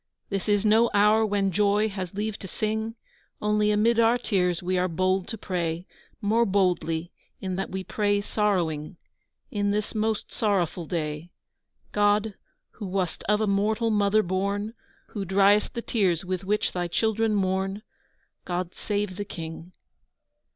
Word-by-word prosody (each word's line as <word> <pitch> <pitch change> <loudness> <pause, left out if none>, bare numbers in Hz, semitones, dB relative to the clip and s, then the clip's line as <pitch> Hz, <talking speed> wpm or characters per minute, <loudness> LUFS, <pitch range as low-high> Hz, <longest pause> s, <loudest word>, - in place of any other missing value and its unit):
This 195 +1 -2
is 205 0 +2
no 225 +2 +5
hour 210 +2 +5
when 200 -2 +1
joy 205 +3 +3
has 190 -3 -5
leave 210 +1 -2
to 190 - -7
sing; 220 +4 -2 0.4
Only, 210 0 +2
amid 220 +3 +3
our 230 +1 +5
tears, 180 -7 0
we 185 +1 0
are 180 0 +2
bold 185 +2 0
to 225 - -5
pray, 175 -3 -2 0.4
More 220 +3 +3
boldly, 180 -5 +1 0.3
in 185 -1 -3
that 195 - -2
we 190 0 -4
pray 205 0 +1
sorrowing, 180 -7 -1 0.5
In 205 -1 0
this 210 +1 -1
most 220 -1 -1
sorrowful 180 -6 0
day. 155 0 -3 0.6
God, 205 +1 +2 0.4
who 205 - -7
wast 185 -2 -2
of 210 +1 +3
a - - +3
mortal 215 +3 +1
Mother 210 0 +3
born, 200 +4 -1 0.4
Who 205 - -4
driest 200 +4 +3
the 235 - -3
tears 190 -6 +1
with 185 0 -3
which 210 +2 0
Thy 175 -1 -2
children 220 +4 +1
mourn, 195 +1 0 0.6
God, 175 0 -3
save 205 -3 -2
the 205 - -2
King! 165 -1 -8
200 Hz, 150 wpm, -26 LUFS, 185-210 Hz, 0.6 s, no